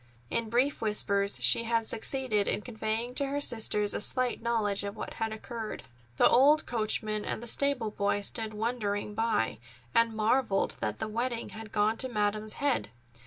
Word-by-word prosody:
In 230 -1 -1
brief 255 +5 +1
whispers 200 -2 +1
she 230 - +6
had 230 -1 +1
succeeded 220 -2 0
in - - 0
conveying 225 +1 -3
to 280 +2 -1
her 285 +1 -2
sisters 215 -6 +1
a - - -2
slight 250 +2 +1
knowledge 215 -4 0
of 200 +1 -5
what - - -6
had 225 0 -2
occurred. 220 0 -6 0.3
The - - +6
old 290 +5 +5
coachman 215 -2 -1
and 230 - -3
the - - -6
stable 250 -2 +1
boy 205 0 0
stood 220 +1 0
wondering 210 -2 -2
by 215 - 0 0.3
and 230 -1 +3
marvelled 220 -1 +1
that - - -2
the 220 - -3
wedding 235 +2 -2
had 220 -1 -9
gone 215 +1 +1
to 260 - 0
Madam's 210 -1 -1
head. 275 - 0
220 Hz, 170 wpm, -29 LUFS, 210-240 Hz, 0.3 s, she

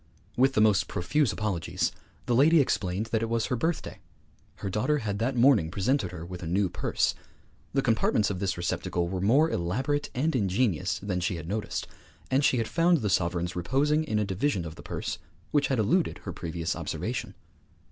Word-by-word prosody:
With 135 +2 +3
the 110 - +3
most 105 -3 +4
profuse 110 - +1
apologies, 105 -6 -1 0.3
the 120 - 0
lady 155 +7 +6
explained 105 -6 0
that 110 - +1
it 115 - -1
was 115 -1 +1
her 125 - -1
birthday; 160 +7 -2 0.6
her - - -6
daughter 110 +10 +1
had 105 -6 -3
that 125 +4 0
morning 120 - +5
presented 100 - 0
her 85 -2 -7
with 90 0 -8
a 85 - -5
new 95 +2 +1
purse; - - 0 0.6
the 135 0 +1
compartments 110 -3 +2
of 90 - -4
this 95 -3 -1
receptacle 85 0 -1
were 95 +1 -3
more 140 +11 +4
elaborate 130 +13 -1
and 145 +4 +1
ingenious 95 -4 +1
than 95 -2 -2
she 90 0 -1
had 80 -1 -7
noticed; 105 +3 -3 0.5
and 135 +2 +3
she 130 - +3
had 115 -2 0
found 170 +1 +3
the 105 -3 0
sovereigns 85 0 0
reposing 140 - +1
in 125 -9 -1
a 105 - +1
division 95 0 -1
of 80 - -6
the 85 - -12
purse - - -4 0.3
which 145 -1 +3
had 135 - 0
eluded 130 - +1
her - - -5
previous 85 0 -3
observation. - - -4
105 Hz, 190 wpm, -28 LUFS, 90-135 Hz, 0.6 s, lady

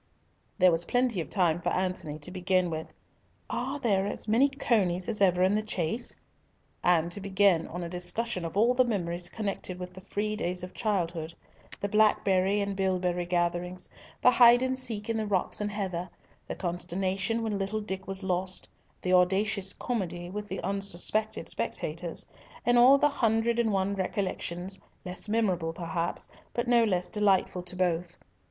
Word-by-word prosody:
There 185 -2 +6
was 165 +1 +2
plenty 245 -5 +1
of - - -7
time 175 -4 +2
for - - 0
Antony 180 -5 -2
to 155 +4 -7
begin 185 -1 +1
with, 160 0 -5 0.6
"Are 265 +3 -2
there 200 -6 +1
as 205 - -3
many 235 +6 +4
conies 205 -10 +1
as 215 -3 -1
ever 180 -2 +4
in 190 +2 +3
the 215 - +2
chase?" 210 +2 -1 0.7
and 170 -1 +3
to 200 - -2
begin 190 -3 +3
on 175 +1 -5
a - - -4
discussion 185 +3 -2
of 165 +3 -5
all 235 +4 +4
the 255 0 +4
memories 175 -6 -2
connected 195 -3 -4
with 180 0 -7
the 185 - -11
free 210 +2 -2
days 180 -2 -2
of 180 - -7
childhood, 170 -6 -2 0.4
the 200 - -1
blackberry 200 -2 +3
and 200 0 -2
bilberry 180 -2 0
gatherings, 175 +1 -1 0.4
the 250 - +7
hide 245 0 +7
and 260 0 0
seek 225 -4 -2
in 230 -1 -1
the 215 -1 -2
rocks 195 0 0
and 210 - -1
heather, 185 -4 -3 0.4
the - - -4
consternation 185 +5 -1
when 210 -3 -2
little 200 +3 -1
Dick 190 -2 -5
was 195 0 0
lost, 185 0 0 0.4
the 185 - +1
audacious 195 +2 +3
comedy 175 -7 -4
with 210 +1 -5
the - - -4
unsuspected 200 +3 -1
spectators, - - -2 0.4
and 245 0 +4
all 260 +3 +8
the 295 - +4
hundred 230 -3 +1
and 225 -2 +2
one 195 0 0
recollections, 190 -1 -3 0.3
less 180 +3 -3
memorable 185 -7 0
perhaps, 170 0 -3 0.3
but 240 0 -1
no 240 -1 +5
less 180 -4 +1
delightful 195 -3 +1
to 180 +1 -4
both. 175 -1 -1
190 Hz, 170 wpm, -28 LUFS, 180-215 Hz, 0.7 s, all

